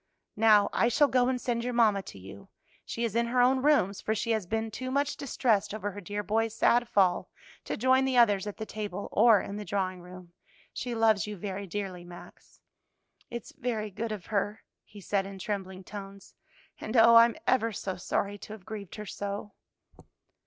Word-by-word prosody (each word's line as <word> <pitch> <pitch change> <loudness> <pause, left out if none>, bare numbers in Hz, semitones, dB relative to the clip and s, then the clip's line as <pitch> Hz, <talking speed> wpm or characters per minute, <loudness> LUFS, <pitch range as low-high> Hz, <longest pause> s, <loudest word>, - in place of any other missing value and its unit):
"Now, 210 -2 +5
I 230 - +3
shall 285 +5 +4
go 250 -1 +2
and 255 -1 0
send 235 -1 -2
your 250 0 -2
mamma 215 -4 +4
to 145 - -11
you; 95 +1 -12 0.4
she 235 - -4
is 230 -2 -2
in 235 0 +2
her 250 +1 0
own 255 +1 +4
rooms, 260 -9 +2
for 220 - -1
she 230 +2 -1
has 215 -5 -1
been 225 +2 -2
too 255 +4 -5
much 280 +2 0
distressed 215 -6 0
over 205 -1 -3
her 205 +1 -8
dear 205 +3 -4
boy's 225 +1 0
sad 240 0 +3
fall 185 -3 +2 0.4
to - - -3
join 260 +3 +3
the 265 -1 +1
others 205 -4 +4
at 205 - -6
the 220 - -5
table 210 -2 -5
or 220 -1 +6
in 200 - -6
the 210 - -5
drawing 185 -3 -2
room. 180 -1 -12 0.4
She 245 -2 -4
loves 220 -3 +3
you 210 -1 -6
very 195 +1 -5
dearly, 190 -2 -5
Max." 175 0 -14 0.7
"It's 235 -2 -7
very 220 -4 -3
good 225 +4 -4
of 205 -5 -6
her," 205 0 -2 0.2
he 205 - -14
said 195 0 -1
in 195 0 -9
trembling 190 -1 -5
tones, 195 0 -10 0.5
"and 220 +3 -3
oh, 230 +1 +8
I'm 230 0 +6
ever 235 -3 +2
so 195 -2 -4
sorry 200 +3 -2
to 210 - -9
have 205 -4 -12
grieved 210 -4 -7
her 210 - -7
so!" 200 +1 -5
210 Hz, 200 wpm, -29 LUFS, 200-235 Hz, 0.7 s, oh